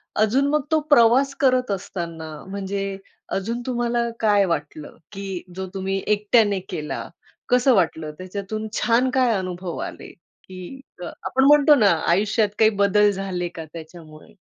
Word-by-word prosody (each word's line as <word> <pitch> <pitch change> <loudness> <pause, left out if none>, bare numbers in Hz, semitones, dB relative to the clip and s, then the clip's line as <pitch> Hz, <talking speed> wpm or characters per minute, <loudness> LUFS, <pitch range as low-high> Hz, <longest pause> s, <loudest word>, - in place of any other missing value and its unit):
अजून 245 +7 +2
मग 300 0 +2
तो 315 - +4
प्रवास 270 +1 +5
करत 255 -5 +2
असताना 170 -4 -5 0.2
म्हणजे 195 0 -4 0.4
अजून 230 +5 -3
तुम्हाला 240 -1 0
काय 205 -3 +3
वाटलं? 150 -3 -4 0.2
की 195 -3 -6
जो 190 0 -5
तुम्ही 195 0 -2
एकट्याने 210 -1 +3
केला, 150 -1 -5 0.4
कसं 250 +1 +4
वाटलं? 160 -4 0
त्याच्यातून 200 +4 -5
छान 235 +4 +2
काय 255 -3 +3
अनुभव 180 -2 -5
आले, - - -10 0.4
की 185 +8 -9 0.2
अ, - - -5
आपण 265 +8 -2
म्हणतो 295 +1 +6
ना, 215 -7 +4 0.2
आयुष्यात 205 +4 +2
काही 220 - +6
बदल 205 0 +3
झाले 185 -2 -3
का 165 - -6
त्याच्यामुळे? 160 +2 -12
200 Hz, 140 wpm, -22 LUFS, 185-235 Hz, 0.4 s, म्हणतो